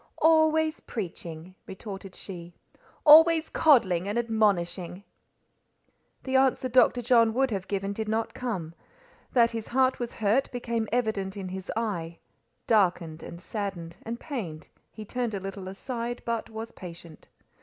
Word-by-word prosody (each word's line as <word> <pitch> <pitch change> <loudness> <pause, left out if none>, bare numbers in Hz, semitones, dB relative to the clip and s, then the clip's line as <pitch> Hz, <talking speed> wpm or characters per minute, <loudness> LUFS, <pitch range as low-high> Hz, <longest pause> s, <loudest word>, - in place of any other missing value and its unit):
"Always 315 -1 +3
preaching," 175 -4 -7
retorted 195 -1 -8
she; 175 -3 -8 0.5
"always 320 +1 +8
coddling 195 - +4
and 205 +3 -2
admonishing." 195 -5 0 1.2
The 265 0 -2
answer 265 -1 +2
Dr. 245 0 +4
John 230 -2 +4
would 265 -1 +2
have 195 -3 -3
given 200 0 -2
did 220 +1 -4
not 220 +1 -1
come; 190 -10 -4 0.6
that 235 -2 +4
his 225 -2 -5
heart 260 +1 +2
was 240 -1 -4
hurt 225 +5 +1
became 235 -3 -2
evident 215 -5 -1
in 190 -2 -5
his 190 +1 -6
eye; 170 -7 -3 0.5
darkened, 175 -7 +1
and 170 - -9
saddened, 180 -4 -5
and 230 +1 -5
pained, 190 - -6 0.2
he 215 - -9
turned 240 -1 -2
a - - -2
little 195 0 -7
aside, 235 +5 -5
but 230 -1 -2
was 225 +1 -7
patient. 170 -4 -11
220 Hz, 140 wpm, -27 LUFS, 185-245 Hz, 1.2 s, always